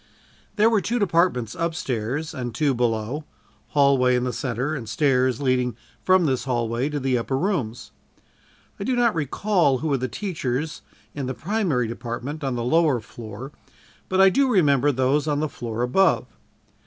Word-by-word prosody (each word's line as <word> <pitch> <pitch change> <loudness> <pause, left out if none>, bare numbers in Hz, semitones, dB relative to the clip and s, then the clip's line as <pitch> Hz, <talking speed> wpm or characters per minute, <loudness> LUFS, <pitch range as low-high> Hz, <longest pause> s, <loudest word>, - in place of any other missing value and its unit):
There 215 +1 +4
were 225 -3 +3
two 235 +5 -1
departments 170 - +1
up 165 0 -2
stairs 135 +3 -3
and 120 -5 -5
two 145 +1 +2
below 120 +4 -1 0.4
hallway 140 -3 +3
in 125 - 0
the 125 -1 -2
center 125 +3 -2
and 120 -8 -5
stairs 130 0 +2
leading 125 -3 +1 0.3
from 185 -2 +4
this 130 -3 0
hallway 120 +1 -1
to 150 -1 -2
the 130 -2 +1
upper 130 +3 -2
rooms. 135 - -2 0.9
I - - -3
do 255 +4 0
not 240 -2 +3
recall 165 -1 +1
who 155 +4 -3
were 140 -2 +1
the 130 - -1
teachers 150 - -3 0.3
in 140 -3 -4
the 130 - -3
primary 180 - 0
department 120 +6 -5
on 135 -2 -1
the 120 - -2
lower 150 0 +3
floor, 115 +4 -9 0.6
but 185 - +1
I 195 0 +8
do 275 +5 +2
remember 145 - +3
those 135 +3 +1
on 145 -1 +1
the 155 - 0
floor 120 -4 -4
above. 165 +8 +3
135 Hz, 170 wpm, -24 LUFS, 125-165 Hz, 0.9 s, I